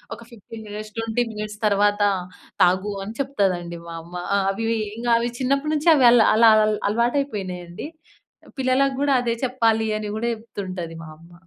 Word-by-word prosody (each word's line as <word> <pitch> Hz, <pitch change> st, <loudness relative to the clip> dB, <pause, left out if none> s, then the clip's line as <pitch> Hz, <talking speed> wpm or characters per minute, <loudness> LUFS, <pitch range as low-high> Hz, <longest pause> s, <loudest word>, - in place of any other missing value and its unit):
ఒక -, -, -15 dB
15 225 Hz, 0 st, -11 dB
minutes, 215 Hz, +1 st, -8 dB
20 225 Hz, +1 st, 0 dB
minutes 210 Hz, -1 st, -6 dB
తర్వాత 205 Hz, 0 st, +2 dB, 0.6 s
"తాగు" 185 Hz, +3 st, +2 dB
అని 220 Hz, -, -7 dB
చెప్తదండి 180 Hz, -10 st, -1 dB
మా 165 Hz, -, -7 dB
అమ్మ. 170 Hz, +2 st, -16 dB, 0.2 s
ఆ! -, -, +3 dB
అవి 225 Hz, +3 st, -3 dB, 0.3 s
ఇంగ 240 Hz, +1 st, -5 dB
అవి 235 Hz, +1 st, -1 dB
చిన్నప్పటి 275 Hz, +4 st, 0 dB
నుంచి 305 Hz, +3 st, +2 dB
అవి 265 Hz, -4 st, +4 dB
అలా 235 Hz, -2 st, +5 dB
అలా 225 Hz, 0 st, +7 dB, 0.2 s
అల్ 215 Hz, -, 0 dB
అలవాటు 235 Hz, +6 st, +1 dB
అయిపోయినాయండి. 185 Hz, -5 st, -6 dB, 0.7 s
"పిల్లలకి 265 Hz, +1 st, +2 dB
గూడా 285 Hz, -1 st, +3 dB
అదే 235 Hz, -1 st, 0 dB
చెప్పాలి" 225 Hz, -3 st, +1 dB
అని 210 Hz, -, -5 dB
గూడా 235 Hz, +2 st, -1 dB
చెప్తుంటది 185 Hz, -6 st, -7 dB
మా 160 Hz, -, -10 dB
అమ్మ. 170 Hz, +1 st, -18 dB
220 Hz, 165 wpm, -22 LUFS, 195-245 Hz, 0.7 s, అలా